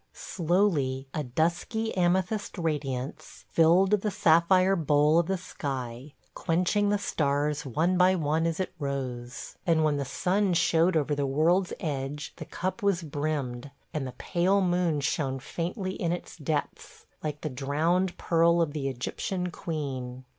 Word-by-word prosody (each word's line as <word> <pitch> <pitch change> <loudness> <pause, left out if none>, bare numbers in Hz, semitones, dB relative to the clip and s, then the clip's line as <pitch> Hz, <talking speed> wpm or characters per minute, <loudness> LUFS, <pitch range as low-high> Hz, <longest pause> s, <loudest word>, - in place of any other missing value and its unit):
Slowly 160 -7 0
a 155 - -2
dusky 170 - -1
amethyst 185 +4 0
radiance 145 -5 -4
filled 175 +4 +5
the 210 0 +2
sapphire 185 0 +4
bowl 150 -1 +3
of 170 - 0
the 190 0 0
sky, 135 -5 -6 0.2
quenching 185 +5 +1
the 205 - +2
stars 145 -5 -1
one 170 +8 +1
by 185 +1 +5
one 160 0 +1
as 165 +1 -2
it 185 - -2
rose, 130 -3 -4
and 165 -2 +3
when 150 -2 +2
the 140 - -1
sun 180 +7 0
showed 165 +1 +3
over 150 -1 0
the 140 -1 0
world's 170 +7 +2
edge 145 -1 -4
the - - -7
cup 185 +5 -4
was 195 -4 +1
brimmed, 145 -4 -3 0.2
and 145 -4 -2
the 125 - -7
pale 185 +6 +1
moon 175 -5 +1
shone 135 -2 -1
faintly 180 - -4
in 170 -3 -1
its 175 - -5
depths, 150 -2 -4 0.2
like 150 -1 -4
the - - -2
drowned 160 +8 0
pearl 170 0 +3
of 165 -4 +1
the 140 -3 -2
Egyptian 180 +8 -3
queen. 130 -7 -5
160 Hz, 150 wpm, -28 LUFS, 140-180 Hz, 0.2 s, filled